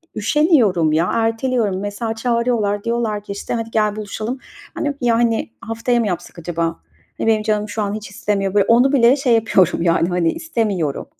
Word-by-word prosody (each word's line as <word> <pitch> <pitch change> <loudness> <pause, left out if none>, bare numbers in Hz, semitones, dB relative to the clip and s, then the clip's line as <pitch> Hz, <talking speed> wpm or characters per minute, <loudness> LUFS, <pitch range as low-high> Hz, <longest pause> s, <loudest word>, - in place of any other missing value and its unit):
üşeniyorum 220 - +3
ya. 165 +3 +2
Erteliyorum. 225 -3 0
Mesela, 215 +2 -3
çağırıyorlar, 230 -3 0
diyorlar 230 -3 -1
ki, 200 - -8
işte, 200 - -5
"Hadi, 230 -1 -3
gel 210 -2 +1
buluşalım." 215 +4 -5 0.4
"Hani, 290 -1 -1
yani, 235 -2 +1
haftaya 230 +2 -1
mı 225 - 0
yapsak 175 -1 -5
acaba? 170 0 -2 0.5
Hani, - - -2
benim 220 -1 +3
canım 210 -1 -1
şu 215 +1 -3
an 200 0 -2
hiç 215 -2 -6
istemiyor." 200 -2 -2
Böyle, 200 -1 +3
onu 245 +4 +4
bile 245 0 +5
şey 270 -4 +1
yapıyorum 205 -7 +2
yani, 170 0 +2
hani, 175 -2 +1
istemiyorum. 210 - -2
220 Hz, 170 wpm, -19 LUFS, 200-235 Hz, 0.5 s, bile